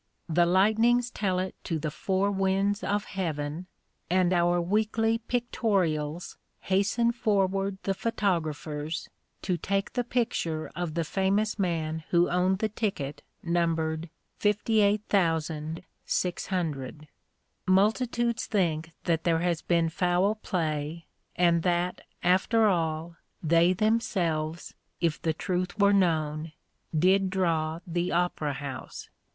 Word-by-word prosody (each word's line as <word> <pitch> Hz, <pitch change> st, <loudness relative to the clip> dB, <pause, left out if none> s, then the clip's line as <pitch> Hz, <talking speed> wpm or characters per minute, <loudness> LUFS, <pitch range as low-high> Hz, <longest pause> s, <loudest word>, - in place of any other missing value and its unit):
The 170 Hz, +1 st, +3 dB
lightnings 225 Hz, +6 st, +3 dB
tell 190 Hz, -6 st, -1 dB
it 185 Hz, +1 st, -2 dB
to 165 Hz, -, -1 dB
the 155 Hz, -1 st, -3 dB
four 190 Hz, +5 st, 0 dB
winds 195 Hz, +1 st, +1 dB
of 205 Hz, 0 st, 0 dB
heaven, 160 Hz, -2 st, -3 dB, 0.4 s
and 185 Hz, 0 st, +3 dB
our 175 Hz, 0 st, +3 dB
weekly 220 Hz, +5 st, +1 dB
pictorials 190 Hz, -10 st, -1 dB, 0.2 s
hasten 200 Hz, +5 st, +2 dB
forward 195 Hz, -4 st, 0 dB
the 195 Hz, -, 0 dB
photographers 165 Hz, -7 st, -2 dB, 0.3 s
to 180 Hz, -2 st, 0 dB
take 195 Hz, +4 st, -1 dB
the 245 Hz, -, 0 dB
picture 225 Hz, -10 st, -1 dB
of 175 Hz, -3 st, -3 dB
the 170 Hz, -, +1 dB
famous 200 Hz, +6 st, 0 dB
man 160 Hz, -4 st, -1 dB
who 175 Hz, 0 st, +3 dB
owned 180 Hz, +2 st, +2 dB
the 215 Hz, +2 st, -1 dB
ticket 195 Hz, -10 st, -3 dB, 0.2 s
numbered 165 Hz, -1 st, 0 dB, 0.3 s
58,600. 175 Hz, -, 0 dB, 0.6 s
Multitudes 230 Hz, +5 st, +2 dB
think 165 Hz, -5 st, 0 dB
that 165 Hz, -2 st, 0 dB
there 165 Hz, -2 st, +2 dB
has 175 Hz, -2 st, 0 dB
been 170 Hz, -2 st, +2 dB
foul 180 Hz, +4 st, +2 dB
play, 160 Hz, -5 st, -3 dB, 0.3 s
and 170 Hz, -1 st, +3 dB
that, 175 Hz, +1 st, 0 dB, 0.2 s
after 190 Hz, +5 st, +3 dB
all, 165 Hz, -3 st, 0 dB, 0.3 s
they 170 Hz, +2 st, +4 dB
themselves, 175 Hz, -6 st, 0 dB, 0.3 s
if 165 Hz, -3 st, 0 dB
the 160 Hz, -, 0 dB
truth 180 Hz, +2 st, -2 dB
were 200 Hz, -1 st, +5 dB
known, 155 Hz, -4 st, +1 dB, 0.4 s
did 190 Hz, +4 st, +4 dB
draw 165 Hz, -3 st, 0 dB
the 175 Hz, +1 st, -1 dB
Opera 170 Hz, -4 st, 0 dB
House. 135 Hz, -2 st, -7 dB
180 Hz, 115 wpm, -28 LUFS, 160-200 Hz, 0.6 s, were